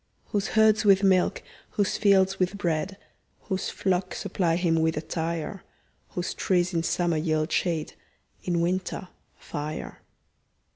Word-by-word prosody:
Whose 205 -1 0
herds 220 0 +5
with 200 -1 +5
milk, 185 -2 +3 0.3
whose 205 -2 +2
fields 195 -2 +3
with 185 +2 0
bread, 185 +1 -1 0.4
Whose 190 -2 -2
flocks 185 -1 -1
supply 170 -3 0
him 170 -2 +2
with 160 -1 +1
attire; 165 +3 -3 0.5
Whose 180 0 -2
trees 180 -1 +1
in 165 - +1
summer 170 0 0
yield 155 0 0
shade, 165 -4 0 0.5
In 175 -2 0
winter, 185 +1 -2 0.3
fire. 150 +1 -6
180 Hz, 130 wpm, -26 LUFS, 165-195 Hz, 0.5 s, herds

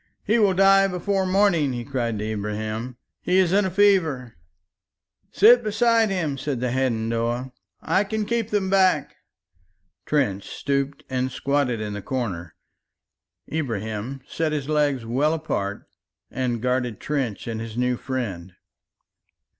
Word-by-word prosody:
"He 225 +3 +2
will 200 -3 +3
die 195 +1 +6
before 190 +1 -1
morning," 185 -8 +3
he 120 -1 -4
cried 120 -5 -2
to 105 - -3
Ibrahim, 110 +3 -4 0.2
"he 180 - +1
is 185 -2 +3
in 205 0 +4
a - - 0
fever!" 175 - +2 1.0
"Sit 240 +4 +6
beside 225 +1 +3
him," 160 -8 -2
said 135 -2 -2
the 125 0 -1
Hadendoa. 120 0 -1 0.3
"I 195 - +2
can 215 +1 -2
keep 230 -1 -1
them 205 -2 0
back." 190 -1 +2 0.9
Trench 115 -10 0
stooped 140 0 -2
and 130 0 -1
squatted 140 -4 0
in 105 -1 -4
the 105 - -5
corner, 95 - -4 1.0
Ibrahim 115 -3 -3
set 160 -2 -1
his 145 -2 -3
legs 145 -5 +1
well 140 +7 +1
apart 105 -11 -3 0.4
and 120 -2 -2
guarded 125 -3 -1
Trench 135 -8 -2
and 110 -1 -4
his 115 0 -7
new 125 0 +1
friend. 105 -10 -5
135 Hz, 140 wpm, -24 LUFS, 115-185 Hz, 1.0 s, die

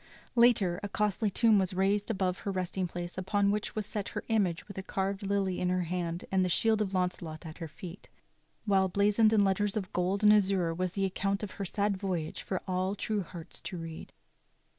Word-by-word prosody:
Later 225 -7 +4
a 205 - -4
costly 210 +1 0
tomb 220 +1 +4
was 185 -1 -1
raised 200 +3 +1
above 190 -4 0
her - - -4
resting 185 0 -1
place 175 +1 -5
upon 200 +1 +2
which 210 +1 -2
was 215 -1 -2
set 205 -1 -4
her - - -5
image 200 -7 +1
with 200 -2 -7
a - - -2
carved 195 +1 -2
lily 195 -2 0
in 180 - 0
her 180 0 +1
hand 170 0 -3
and 190 -1 +3
the 180 - 0
shield 220 +4 +3
of 195 -2 -1
Launcelot 180 -3 -2
at 160 +1 -9
her 165 - -4
feet, 170 +4 -10 0.6
while 195 -2 +3
blazoned 205 +3 +3
in 215 -2 +4
letters 200 +1 +1
of 190 -3 -4
gold 185 +3 0
and 210 0 +8
azure 190 -5 +2
was 180 +1 -2
the 195 0 0
account 195 +2 -1
of 205 - -4
her 200 - -5
sad 200 +1 0
voyage 180 -5 -3
for 190 - -3
all 185 +1 0
true 210 0 -1
hearts 170 -2 -7
to 185 - -6
read. 165 -1 -7
190 Hz, 210 wpm, -30 LUFS, 180-205 Hz, 0.6 s, and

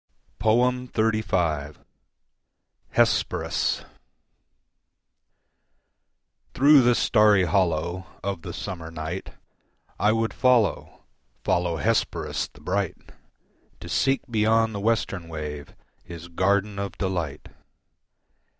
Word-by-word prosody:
XXXV. 110 - +1 1.1
Hesperus - - +1 2.7
Through 140 +2 +7
the 120 -1 +4
starry 105 -4 +4
hollow 85 +1 0 0.2
Of 100 -3 -3
the - - -7
summer 85 -3 -6
night 80 +3 -6 0.7
I 105 - +3
would 115 0 0
follow, 125 -5 +1 0.4
follow 90 -2 +1
Hesperus 115 +7 -1
the 75 - -19
bright, 95 +2 -3 0.7
To - - -9
seek 135 +10 +1
beyond 110 -1 +2
the 100 - -4
western 100 -5 -1
wave 75 -2 -7 0.3
His 85 0 -10
garden 100 +3 0
of 100 0 -3
delight. 85 -7 -3
100 Hz, 85 wpm, -25 LUFS, 85-110 Hz, 2.7 s, Through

